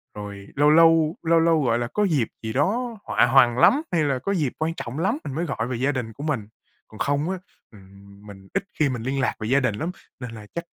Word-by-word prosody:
Rồi 100 -1 -8
lâu 145 +1 +4
lâu, 165 0 +5
lâu 165 0 +4
lâu, 165 -2 +3
gọi 120 -2 +1
là, 120 - -2
có 210 - +1
dịp 150 - +1 0.2
gì 110 0 -4
đó 225 - 0
họa - - +3
hoằn 120 -1 +5
lắm 255 - +5
hay 165 -3 +2
là 140 -3 0
có 195 - -3
dịp 150 -9 -1
quan 160 +1 -1
trọng 125 +6 -5
lắm 195 - +1
mình 135 - -5
mới 165 +3 -1
gọi 120 -7 -3
về 125 - -3
gia 135 +4 +1
đình 125 -5 -4
của 140 - -9
mình, 135 -9 -2 0.4
còn 110 - -14
không 145 +3 0
á, 190 - -2 0.3
ừm, 100 0 -17
mình 95 -1 -12
ít - - 0 0.2
khi 150 -2 +3
mình 125 -3 -4
liên 135 +3 -2
lạc - - 0
về 110 - -4
gia 135 +4 +3
đình 125 -6 0
lắm, 160 +11 -3 0.3
nên 125 -2 -7
là 110 -2 -10
chắc 170 - -3
135 Hz, 255 wpm, -24 LUFS, 115-165 Hz, 0.4 s, lâu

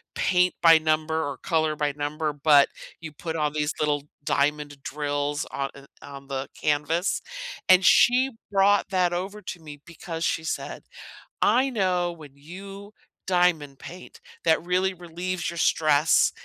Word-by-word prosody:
paint 180 0 +2
by 165 -1 +7
number 155 0 0
or 140 -2 -4
color 160 -3 0
by 150 -1 0
number, 150 +1 -3
but 145 -1 +5 0.3
you 160 -2 -8
put 160 +2 -6
all 150 -2 0
these 150 0 -1
little 145 -1 0 0.2
diamond 145 0 -1
drills 145 +1 -2
on, 140 0 -3
uh 140 0 -13 0.2
on 140 -1 -11
the 135 0 -4
canvas, 155 +5 0 0.5
and 185 0 +6
she 255 +2 +5 0.2
brought 200 +1 +3
that 180 -2 +1
over 195 +4 -4
to 180 -2 -7
me 145 -2 -11
because 165 0 -7
she 160 - 0
said, - - -4 0.6
"I 265 +2 +3
know 180 -5 0
when 150 -4 -13
you 195 +7 -11 0.3
diamond 175 -7 +1
paint 180 +1 -11 0.2
that 160 -1 +3
really 185 +2 +1
relieves 175 +1 -5
your 170 - -9
stress 155 -1 +3
160 Hz, 150 wpm, -25 LUFS, 145-180 Hz, 0.6 s, by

